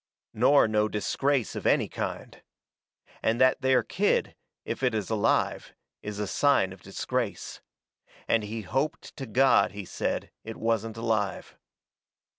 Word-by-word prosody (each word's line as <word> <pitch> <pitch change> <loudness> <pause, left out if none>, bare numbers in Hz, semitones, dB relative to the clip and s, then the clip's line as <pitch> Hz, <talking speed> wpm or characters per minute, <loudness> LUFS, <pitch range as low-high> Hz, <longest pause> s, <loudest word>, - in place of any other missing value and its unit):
Nor 130 +3 +5
no 105 0 +2
disgrace 125 +5 0
of - - -2
any - - +3
kind. - - -6 0.8
And 115 +2 +1
that 130 +1 +4
there 130 -2 +3
kid, - - 0 0.3
if - - -4
it 125 -4 +1
is 105 0 -3
alive, 110 -2 0 0.3
is 105 -1 -6
a 105 - -2
sign 100 -4 +2
of 95 - -16
disgrace. 115 +3 -4 0.7
And 115 - +3
he 110 +2 -5
hoped 135 +10 -3
to 135 -3 -6
God, 130 +2 +4
he 100 -1 -7
said, - - -3
it 110 0 -7
wasn't 115 -1 -1
alive. 110 -3 -2
115 Hz, 140 wpm, -27 LUFS, 105-130 Hz, 0.8 s, Nor